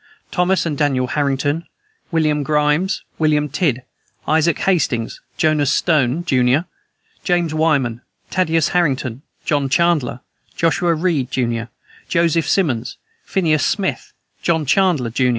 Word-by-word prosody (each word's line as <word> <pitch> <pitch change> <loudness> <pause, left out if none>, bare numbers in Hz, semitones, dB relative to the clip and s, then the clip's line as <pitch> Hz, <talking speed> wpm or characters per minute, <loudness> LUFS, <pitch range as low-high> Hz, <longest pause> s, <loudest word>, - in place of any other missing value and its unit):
Thomas 180 -2 +1
and 155 -3 -1
Daniel 135 -3 +1
Harrington, 145 +4 -1 0.5
William 155 -3 +1
Grimes, 150 +5 +1 0.2
William 150 -2 +2
Tidd, 140 -4 0 0.4
Isaac 160 +1 +2
Hastings, 140 -11 0 0.2
Jonas 155 -4 +2
Stone, 155 0 +1
jun., 130 +2 +2 0.6
James 175 -3 +1
Wyman, 140 -7 +1 0.3
Thaddeus 165 -4 +1
Harrington, 135 -8 0 0.2
John 145 -2 0
Chandler, 155 -6 +1 0.3
Joshua 170 0 +1
Reed, 155 -6 0
jun., 115 -3 -1 0.4
Joseph 165 -3 +1
Simonds, 130 - 0 0.3
Phineas 160 -6 +1
Smith, 195 -3 -1 0.3
John 160 -3 +1
Chandler, 155 -7 +2
jun. 125 +2 +1
155 Hz, 115 wpm, -19 LUFS, 135-170 Hz, 0.6 s, William